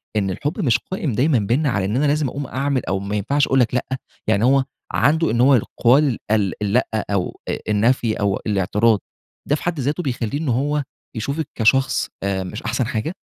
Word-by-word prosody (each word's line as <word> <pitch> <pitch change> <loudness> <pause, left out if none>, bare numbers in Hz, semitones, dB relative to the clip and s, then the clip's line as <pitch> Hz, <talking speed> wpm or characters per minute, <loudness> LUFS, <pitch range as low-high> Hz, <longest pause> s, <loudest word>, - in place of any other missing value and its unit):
إن 100 -2 +1
الحب 145 - -3
مش 130 - +3
قائم 165 -8 -2
دايمًا 130 +3 +3
بيننا 125 +9 +1
على 100 -6 0
إن 105 +4 -1
أنا 145 - +2
لازم 150 0 +2
أقوم 140 +2 -5
أعمل 135 0 -1
أو 95 +3 -1
ما 100 +2 -4
ينفعش 140 +8 +1
أقول 135 - +2
لك 120 -2 +2
لأ، 125 - 0 0.4
يعني 110 -1 +2
هو 135 +1 +4 0.3
عنده 160 +3 +2
إن 120 +1 +1
هو 135 +2 +6
يقال 125 +3 +2
ال 105 -4 +2
اللأ 105 +5 +2
أو 100 -3 -2
أ - - -1
النفي 115 +2 +2
أو 100 -1 +1
الأعتراض 105 +2 +2 0.5
ده 145 - +3
في - - -7
حد 175 -3 -2
ذاته 145 +6 -1
بيخليه 130 0 -2
إن 155 -3 -2
هو 145 +4 0 0.3
يشوفك 140 +7 -2
كشخص 130 +4 +2
آآ، 95 -1 -1
مش 100 +4 -7
أحسن 115 +1 -1
حاجة؟ 120 +10 -3
125 Hz, 200 wpm, -21 LUFS, 105-145 Hz, 0.5 s, هو